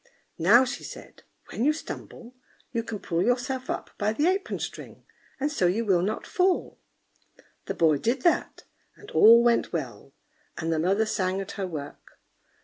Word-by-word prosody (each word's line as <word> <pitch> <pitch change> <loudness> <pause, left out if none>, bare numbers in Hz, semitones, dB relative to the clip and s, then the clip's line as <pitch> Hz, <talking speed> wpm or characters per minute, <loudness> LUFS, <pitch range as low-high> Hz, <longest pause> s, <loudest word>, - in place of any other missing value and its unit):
"Now," 220 +10 +6
she 260 +2 -5
said, - - -11 0.3
"when 230 - -2
you 295 - +4
stumble, 250 -5 -9 0.4
you 230 - -1
can 225 -1 -6
pull 170 -3 -2
yourself 255 +1 -1
up - - -4
by 210 +1 +1
the 295 +7 0
apron 380 +2 0
string, - - -8 0.3
and 290 +2 -1
so 190 -11 +1
you 215 +6 0
will 185 -4 +3
not 200 +4 -2
fall." 370 0 0 0.9
The - - -3
boy 155 -3 +3
did 245 - -1
that, 345 - +1 0.3
and 415 - -14
all 230 +2 +7
went 235 -1 +2
well, 135 -6 -5 0.5
and 165 0 -1
the 160 - 0
mother 195 +6 +2
sang 190 -3 -1
at 195 0 -5
her 195 -2 -4
work. 145 -5 -9
220 Hz, 170 wpm, -26 LUFS, 180-255 Hz, 0.9 s, all